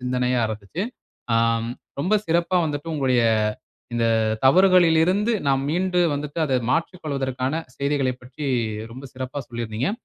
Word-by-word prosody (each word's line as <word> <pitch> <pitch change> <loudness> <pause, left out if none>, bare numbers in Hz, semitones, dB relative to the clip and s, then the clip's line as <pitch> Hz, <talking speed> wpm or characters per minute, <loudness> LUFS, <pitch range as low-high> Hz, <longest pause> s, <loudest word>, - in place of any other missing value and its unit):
சிந்தனையா 125 0 0
இருந்துச்சு. 110 - -5 0.5
ஆ - - +4 0.7
ரொம்ப 185 +9 +2
சிறப்பா 170 +2 +2
வந்துட்டு, 145 +1 -4
உங்களுடைய 130 -4 +2 0.7
இந்த 115 -1 +1 0.4
தவறுகளிலிருந்து 185 - +4
நாம் 135 0 +2
மீண்டு 180 +2 +1
வந்துட்டு 145 +2 -5
அதை 135 -3 +1 0.2
மாற்றிக் 170 +5 -1
கொள்வதற்கான 135 +1 -2 0.2
செய்திகளைப் 140 -3 0
பற்றி 135 +3 -6 0.4
ரொம்ப 130 +3 -9
சிறப்பா 130 +2 -4
சொல்லியிருந்தீங்க, 120 - -2
140 Hz, 120 wpm, -23 LUFS, 125-170 Hz, 0.7 s, ஆ